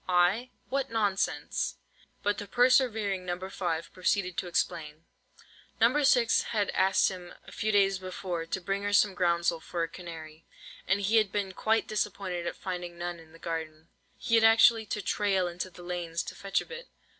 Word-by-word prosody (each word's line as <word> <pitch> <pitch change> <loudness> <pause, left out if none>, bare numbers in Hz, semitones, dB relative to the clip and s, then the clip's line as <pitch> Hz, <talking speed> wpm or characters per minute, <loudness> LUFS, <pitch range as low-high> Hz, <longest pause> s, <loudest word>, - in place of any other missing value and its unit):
"I? 185 +8 +3 0.2
What 270 0 -1
nonsense!" 205 -4 -1 0.5
But 205 0 +1
the 205 - -6
persevering 225 -5 +3
No. 175 -1 -3
5 170 -4 -3
proceeded 185 0 0
to - - -4
explain. 160 -2 -2 0.7
No. 245 +6 +4
6 250 -5 +4
had 210 -3 -1
asked 190 0 +3
him 180 -2 -9
a - - -12
few 215 - -1
days 195 -2 +3
before 180 -2 -4
to 190 - -2
bring 195 +2 -2
her 205 0 -2
some 205 -1 +4
groundsel 170 -2 +1
for 170 +1 -4
her 165 - 0
canary, 165 -2 -10 0.4
and 195 +2 +2
he 210 +3 +3
had 215 -3 +3
been 200 -2 -2
quite 220 +4 +1
disappointed 190 -4 -2
at - - -3
finding 175 -2 -5
none 175 0 -4
in 160 -1 -16
the 165 - -15
garden. 160 -1 -5 0.3
He 230 - -4
had 225 -1 +6
actually 225 0 +6
to 210 0 -3
"trail" 195 -2 +1
into 175 +2 -5
the 175 0 -13
lanes 175 -2 -3
to - - -7
fetch 195 0 -1
a - - -9
bit. 475 +1 -9
190 Hz, 180 wpm, -29 LUFS, 175-210 Hz, 0.7 s, had